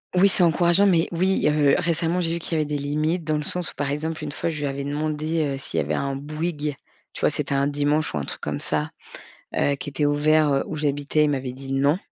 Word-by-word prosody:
Oui, 195 +2 +6
c'est 185 - +3
encourageant, 175 +3 +4
mais 170 -4 +3
oui, 185 0 +2
heu, 150 -1 +4
récemment, 170 +2 0
j'ai 165 -1 0
vu 170 - -2
qu'il 165 - -7
y 155 - +2
avait 150 - 0
des 150 0 -2
limites 155 +4 -1
dans 155 -1 0
le 150 - 0
sens 175 +3 -3
où, - - -20
par 145 -1 -2
exemple, 155 +2 -3
une - - -4
fois, 165 - -2
je 155 - -5
lui 145 - -1
avais 140 0 -3
demandé, 155 +2 -1
heu, - - -6
s'il 135 - -3
y - - +2
avait - - -1
un 140 -1 -1
Bouygues, 150 +1 -3 0.4
tu - - -8
vois, - - +3
c'était 140 - -2
un 140 0 +2
dimanche 145 +1 0
ou 75 - -1
un 70 - -3
truc - - -6
comme - - -3
ça, 75 0 -2 0.6
heu, 140 - +2
qui 140 - -6
était 145 +1 -1
ouvert, 150 0 +3
heu, 135 - +2
où 155 - -4
j'habitais. 145 +1 +1
Il - - +1
m'avait 130 -2 -2
dit: 135 +1 -6
«Non» 140 +4 +3
150 Hz, 265 wpm, -24 LUFS, 140-165 Hz, 0.6 s, Oui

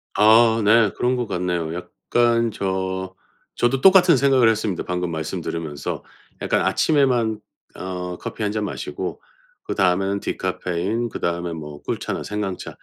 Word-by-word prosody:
아 110 +1 +5
네 110 0 +5
그런 125 +1 +1
것 125 -1 -1
같네요. 90 -3 -2
약간 115 +6 0
저, 95 -2 -3 0.4
저도 130 +2 +1
똑같은 185 -3 +7
생각을 130 -3 +4
했습니다 105 -5 -1
방금 90 -1 -2
말씀 80 -1 -4
들으면서. 80 -3 -4 0.4
약간 - - +1
'아침에만 125 -8 +2 0.4
어 90 -1 -5
커피 110 - -5
1 105 - 0
잔 105 0 -2
마시고, - - -5 0.4
그다음에는 95 +1 +1
디카페인, 100 +9 -2
그다음에 85 -2 -3
뭐 75 -2 -8
꿀차나 - - -3
생강차 105 -3 -5
100 Hz, 300 characters per minute, -22 LUFS, 90-115 Hz, 0.4 s, 똑같은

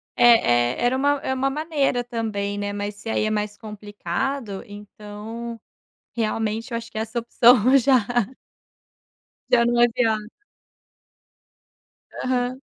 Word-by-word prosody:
é 125 - +5
é - - -4
era 250 +2 +2
uma 285 +1 +2
é 265 - -2
uma 265 +1 0
maneira 285 -4 0
também, 215 -4 -3
né, 205 0 -3
mas 205 0 -4
se 225 +2 -8
aí 215 - 0
é - - 0
mais 210 -1 -2
complicado, 210 +2 -4
então 210 +3 -9 0.6
realmente 225 +1 -2
eu 230 - -1
acho 230 0 -8
que - - -8
essa 220 +2 -2
opção 240 +2 +5
já 260 0 +4 1.5
já 235 - +5
não 240 0 +2
é 240 - +7
viável. 225 -3 0 2.0
Aham. 255 0 -1
230 Hz, 130 wpm, -23 LUFS, 210-245 Hz, 2.0 s, é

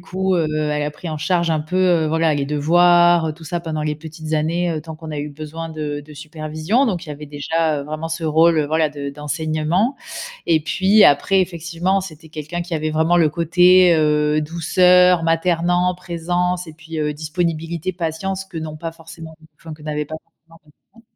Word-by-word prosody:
coup, 190 +1 -1
heu, 165 -3 +1
elle 150 -1 -1
a 145 - -2
pris 160 +3 -9
en 155 -1 -4
charge 170 +2 0
un 155 - 0
peu, 155 +4 -4
heu, 175 -4 +3
voilà 160 0 +2
les 140 -1 -1
devoirs, 175 +3 +4
heu, 155 - -2
tout 160 +1 -14
ça 170 +2 -3
pendant 160 -2 -4
les 150 0 -1
petites 155 0 -8
années, 165 +3 0
heu, 155 - -3
tant 160 +1 -9
qu'on 155 0 -8
a 150 - -4
eu 145 +1 -4
besoin 155 +3 -7
de 150 -2 -4
de 150 +1 -14
supervision, 155 - -1
donc 185 -7 -2
il - - -8
y - - -3
avait 150 +1 -9
déjà, 150 +2 -1
heu, - - -7
vraiment 155 +2 -5
ce 165 +1 -4
rôle 160 +1 +4
voilà, 155 +1 +1
de 145 -1 -6
d'enseignement. 155 - -1 0.5
Et 165 -2 +4
puis, 195 +7 +4
après, 180 +7 +4
effectivement, 175 +2 -1
c'était 160 -4 -10
quelqu'un 155 +2 -5
qui 170 0 -5
avait 155 0 -1
vraiment 160 +3 +2
le 165 -3 +4
côté, 175 +3 +5
heu, 150 -1 +2
douceur, 180 +3 +4
maternant, 175 +2 +1
présence 180 0 -2
et 160 - -10
puis 160 0 -8
heu, 150 -1 -1
disponibilité, 165 +2 -3
patience 185 +3 -3
que 180 -4 -7
n'ont 155 -1 -6
pas 165 +2 -5
forcément 165 -1 -12 0.2
enfin 160 -2 -10
que 150 - -17
n'avaient 150 -1 -3
pas 155 - -6
forcément 165 0 -23
mes 150 - -22 0.2
parents. 230 - -20
160 Hz, 205 wpm, -20 LUFS, 155-175 Hz, 0.5 s, côté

